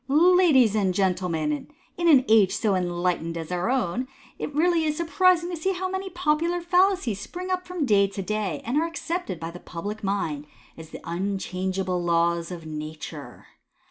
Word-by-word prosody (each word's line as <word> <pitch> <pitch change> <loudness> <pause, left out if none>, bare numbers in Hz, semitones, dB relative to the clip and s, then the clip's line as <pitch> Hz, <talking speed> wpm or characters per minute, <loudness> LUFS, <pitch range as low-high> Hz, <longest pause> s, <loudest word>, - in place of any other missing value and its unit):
— - - -42 0.3
"Ladies 265 - +5
and 195 -4 +1
Gentlemen, 175 -6 0 0.2
— - - -36
In 345 - +2
an 275 -6 +6
age 210 -3 +5
so 215 -1 +1
enlightened 175 -2 -1
as 165 +1 -6
our 180 +4 -1
own, 250 -1 0 0.3
it - - -2
is 290 - -13
really 325 -1 +2
surprising 345 +2 +2
to - - -2
see 380 +4 -1
how 375 +1 -2
many 380 +1 -4
popular 345 0 0
fallacies 355 - +2
spring 365 - -6
up 365 -1 -2
from 360 -4 -2
day 200 -4 +4
to 195 0 -6
day, 200 -6 -2
and 245 +5 0
are 330 - 0
accepted 335 - -4
by 165 +1 -5
the 175 - -10
public 205 +7 -6
mind 160 -7 -2 0.3
as 160 -1 -11
unchangeable 185 0 -2
laws 170 0 +1
of 170 -3 -8
nature. 155 0 -8
205 Hz, 175 wpm, -25 LUFS, -, 0.3 s, an